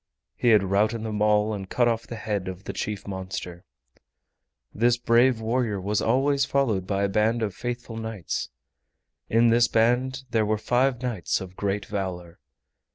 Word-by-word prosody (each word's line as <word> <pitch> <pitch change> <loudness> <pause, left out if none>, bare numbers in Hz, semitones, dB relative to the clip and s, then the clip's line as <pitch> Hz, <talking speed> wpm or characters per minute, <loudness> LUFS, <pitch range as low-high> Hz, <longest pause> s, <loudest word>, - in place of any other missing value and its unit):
He - - -1
had 105 -3 +6
routed 105 +4 +1
them 105 -2 -3
all 105 0 +3
and 95 -2 -6
cut 120 -1 +2
off 115 -1 -1
the 120 - -6
head 105 -4 -3
of 95 +1 -6
the - - -5
chief 105 -2 -4
monster. 95 -2 -6 1.1
This 120 +2 +3
brave 120 +1 +3
warrior 110 -2 -1
was 100 +2 -1
always 140 +4 +2
followed 120 -10 0
by 100 0 0
a - - +3
band 110 +3 +1
of 100 -3 -2
faithful 120 0 -5
knights. 110 -7 -4 0.8
In 115 +1 +4
this 120 +1 +4
band 125 +4 +1
there 110 -1 +2
were 110 0 +1
five 125 +3 +1
knights 120 -8 -1
of 95 -1 -9
great 100 0 -2
valor. 90 -4 -5
110 Hz, 165 wpm, -25 LUFS, 100-120 Hz, 1.1 s, had